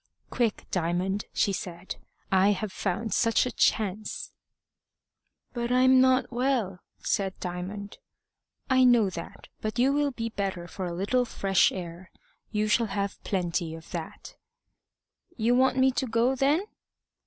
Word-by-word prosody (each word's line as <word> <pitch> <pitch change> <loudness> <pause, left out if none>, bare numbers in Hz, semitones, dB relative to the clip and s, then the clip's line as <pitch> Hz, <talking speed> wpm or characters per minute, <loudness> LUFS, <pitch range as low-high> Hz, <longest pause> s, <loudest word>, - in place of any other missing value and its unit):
"Quick, 235 -4 0
Diamond!" 180 +3 -1
she 200 - +1
said. 180 -1 -6 0.3
"I 190 +2 +5
have 210 0 -4
found 200 +3 -2
such 230 +1 +3
a 250 - -2
chance!" 210 -1 0 1.2
"But 240 0 -2
I'm 255 +1 +6
not 260 -1 +3
well," 240 -7 0 0.2
said 195 -2 -1
Diamond. 190 +3 -6 0.7
"I 260 -1 +4
know 235 -6 +5
that, 170 -2 -8
but 215 +2 -3
you 260 +3 +3
will 290 0 +2
be 230 -3 -4
better 195 -5 -3
for 185 +1 -5
a - - -4
little 205 +8 +1
fresh 195 -5 +2
air. 175 0 -7 0.4
You 215 0 0
shall 225 +2 +2
have 200 0 -3
plenty 175 -3 -1
of 165 0 -13
that." 165 -3 -7 1.0
"You 235 +1 +2
want 260 +1 +3
me 265 0 +5
to 260 +1 -2
go, 230 +3 +2
then?" 280 +7 +2
210 Hz, 140 wpm, -27 LUFS, 185-250 Hz, 1.2 s, I'm